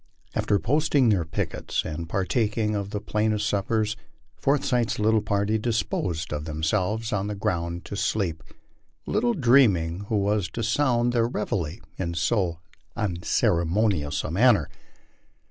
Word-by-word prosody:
After 100 - +1
posting 140 +2 +2
their 95 -6 +2
pickets 80 - -3
and 80 +1 -5
partaking 105 +3 0
of 100 -1 -2
the 105 - -3
plainest 105 0 0
of - - 0
suppers, 105 +2 0 0.4
For 140 - +2
eyth's 120 -4 0
little 110 +1 +3
party 100 +1 0
disposed 100 -8 -1
of 75 0 -4
themselves 95 +8 -1
on 100 -1 -1
the 105 - -3
ground 85 -2 -2
to - - -6
sleep, 95 -5 -1 0.6
little 235 +2 +1
dreaming 100 - +3
who 110 - +1
was 100 -3 +1
to 115 - -3
sound 120 0 +2
their 115 -1 +2
reveille 95 -7 -2 0.2
in 85 -2 -2
so 85 0 0 0.4
unceremonious 85 -4 0
a - - -4
manner. 100 - +4
105 Hz, 140 wpm, -25 LUFS, 85-115 Hz, 0.6 s, manner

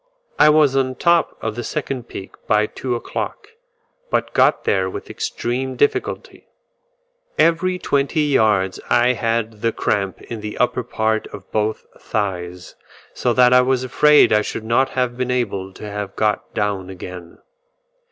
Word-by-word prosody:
I 150 - +7
was 150 -3 +4
on 135 -1 +2
the 130 - -7
top 170 +3 +2
of 110 - -2
the 120 - -4
second 130 -2 -4
peak 95 - -8 0.2
by 105 0 +3
two 125 +3 -4
o'clock, 415 - -5 0.6
but - - -1
got - - +3
there 95 -1 +1
with - - -7
extreme 130 +2 -3
difficulty; 145 - -1 0.9
every 180 +2 +2
twenty 140 -2 0
yards 110 -10 +2
I 120 +1 +4
had 115 -2 -2
the 115 - +1
cramp 100 -3 -1
in 115 -2 -7
the 105 0 -6
upper 125 0 +1
part 110 -2 -1
of 100 -2 -12
both 110 0 -1
thighs, 90 -4 -4 0.4
so 125 - 0
that 125 +1 +5
I 125 - +7
was 130 0 +1
afraid 150 +2 +5
I 105 - +4
should 110 - -5
not 120 +4 +2
have 125 -1 -1
been 125 0 -2
able 100 -6 -2
to 105 - -9
have 105 -1 -5
got 105 -1 0
down 100 -3 -1
again. 90 -2 -9
115 Hz, 160 wpm, -20 LUFS, 105-130 Hz, 0.9 s, I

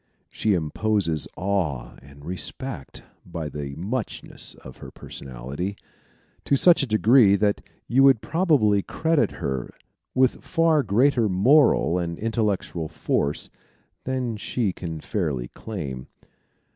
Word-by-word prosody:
She 105 -3 +1
imposes 85 0 0
awe 85 -11 -1
and 70 +2 -15
respect 95 - -6 0.2
by 80 -3 -5
the 70 -1 -6
muchness 105 - -4
of 65 - -13
her - - -10
personality, 70 +10 -6 0.7
to 140 - +3
such 170 +5 +5
a 140 - -1
degree 110 -1 +5
that 100 0 +1 0.3
you 135 +3 +6
probably 120 - +2
credit 160 +7 0
her 65 -7 -3 0.5
with 130 0 +2
far 165 -3 +3
greater 120 +1 +2
moral 100 - +4
and 85 -1 -3
intellectual 105 -7 -1
force 75 -2 -2 0.5
than 125 -4 -2
she 105 -1 -1
can 80 -4 -6
fairly 75 - -2
claim. 70 - -6
100 Hz, 115 wpm, -24 LUFS, 80-125 Hz, 0.7 s, you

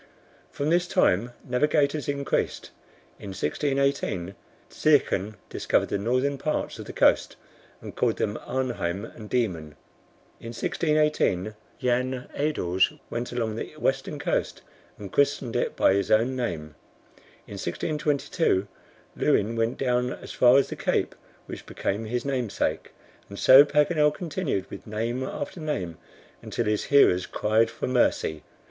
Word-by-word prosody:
From 145 +2 -1
this 175 +1 +2
time 115 - +2 0.2
navigators 145 +2 +1
increased. 140 -1 -2 0.5
In - - -9
1618, 135 - -1 0.4
Zeachen 110 -9 +2
discovered - - 0
the 100 - -1
northern 130 +6 0
parts 155 +2 -2
of - - -7
the - - -7
coast, - - +3 0.5
and - - -9
called - - +1
them 105 - -1
Arnheim 120 -7 -2
and 110 -2 -11
Diemen. 85 -11 -1 0.6
In 115 0 -8
1618, 150 - +1 0.3
Jan 125 0 -1
Edels 95 - +1 0.2
went 120 +1 -3
along 115 -3 -2
the 155 - -6
western 135 +1 -1
coast, 145 - -2 0.3
and 100 -3 -9
christened 140 -4 +1
it - - 0
by - - +4
his 100 0 0
own 115 +4 +3
name. 80 -12 -3 0.7
In 100 - -8
1622, 150 - 0 0.5
Leuwin 110 +3 +1
went 115 +1 0
down 125 -1 0
as - - -10
far 125 +1 +5
as 140 - +2
the - - -5
cape - - 0 0.3
which - - -9
became 105 +3 -3
his 120 +3 -3
namesake." 130 -6 -1 0.4
And 100 - -9
so 130 +6 +9
Paganel 150 +1 +3
continued 150 - -2
with - - -9
name 115 +4 -2
after 145 +5 -5
name 95 - -3 0.4
until 120 - -3
his 105 0 0
hearers 95 -10 +4
cried 110 +2 +2
for - - -5
mercy. 120 - +1
125 Hz, 135 wpm, -26 LUFS, 105-140 Hz, 0.7 s, so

